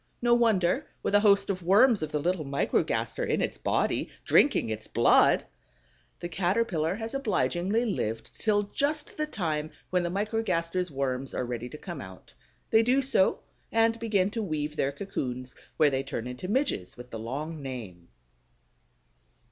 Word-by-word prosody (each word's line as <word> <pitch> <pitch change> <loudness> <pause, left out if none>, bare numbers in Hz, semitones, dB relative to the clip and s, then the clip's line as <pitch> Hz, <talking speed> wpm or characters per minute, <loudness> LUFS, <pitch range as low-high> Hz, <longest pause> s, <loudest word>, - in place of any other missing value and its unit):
No 240 0 +3
wonder, 230 - +2 0.2
with - - -1
a 205 - +7
host 200 -1 +4
of 185 -1 -4
worms 210 +5 +5
of 155 -1 -3
the - - 0
little 170 +2 0
Microgaster 140 0 0
in - - 0
its - - -2
body, - - 0 0.2
drinking - - +4
its 110 0 -4
blood! 115 +1 +4 0.8
The 175 - -3
Caterpillar 175 -1 0
has 225 +2 -5
obligingly 215 -3 0
lived 115 - -3
till 205 -2 +2
just 290 +9 -2
the 305 0 -2
time 155 - -2 0.2
when 180 0 +2
the 175 - -1
Microgaster's 185 -3 -1
worms 135 -2 -2
are 125 - -1
ready 120 0 -4
to 150 - -9
come 175 +1 -7
out. 95 -8 -12 0.4
They 220 - +6
do 255 +4 +2
so, 255 -7 +3 0.3
and 225 0 +2
begin 205 -4 +1
to 225 - -3
weave 155 -5 -3
their 140 -2 0
cocoons, 130 -7 -5 0.2
where 150 -2 +5
they 135 0 0
turn 135 -4 -5
into 125 +8 -6
Midges 210 - -1
with 125 0 -11
the 115 - -5
long 145 +7 -5
name. 110 -11 -7
175 Hz, 165 wpm, -28 LUFS, 135-215 Hz, 0.8 s, a